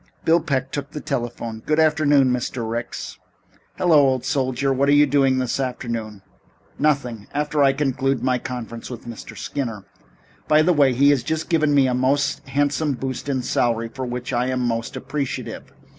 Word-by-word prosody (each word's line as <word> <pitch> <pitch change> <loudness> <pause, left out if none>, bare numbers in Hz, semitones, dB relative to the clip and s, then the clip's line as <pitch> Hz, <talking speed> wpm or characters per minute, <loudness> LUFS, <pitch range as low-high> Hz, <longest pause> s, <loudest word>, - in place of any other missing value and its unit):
Bill 165 +1 +5
Peck 135 -4 -2
took 140 -1 -4
the 150 - -6
telephone. 120 -6 -4
"Good 155 +1 +1
afternoon, 145 -4 +4
Mr. 125 -1 -3
Ricks." 115 +1 -5 0.6
"Hello, 175 -4 +4
old 130 -1 0
soldier. 135 -1 0
What 140 +2 +1
are - - +5
you 145 0 +6
doing 135 -3 +2
this 130 0 -1
afternoon?" 115 -5 -4 0.6
"Nothing 125 -8 0
after 150 0 0
I 135 -1 +5
conclude 135 -1 0
my 130 -1 +1
conference 120 -2 -6
with 120 -3 -8
Mr. 115 -2 -9
Skinner. 115 -8 -4 0.6
By 155 0 +5
the 180 +2 +3
way, 140 -4 +4
he 140 +4 +5
has 140 -3 +2
just 160 +5 -3
given 155 -4 +2
me 140 -2 +5
a 130 - +1
most 130 +3 +1
handsome 145 +2 +1
boost 130 +1 -5
in 130 -2 -1
salary, 115 -1 0
for 130 +1 -5
which 125 0 -4
I 120 +1 +1
am 130 -1 -1
most 115 0 -2
appreciative. 145 -3 -4
130 Hz, 175 wpm, -22 LUFS, 120-145 Hz, 0.6 s, you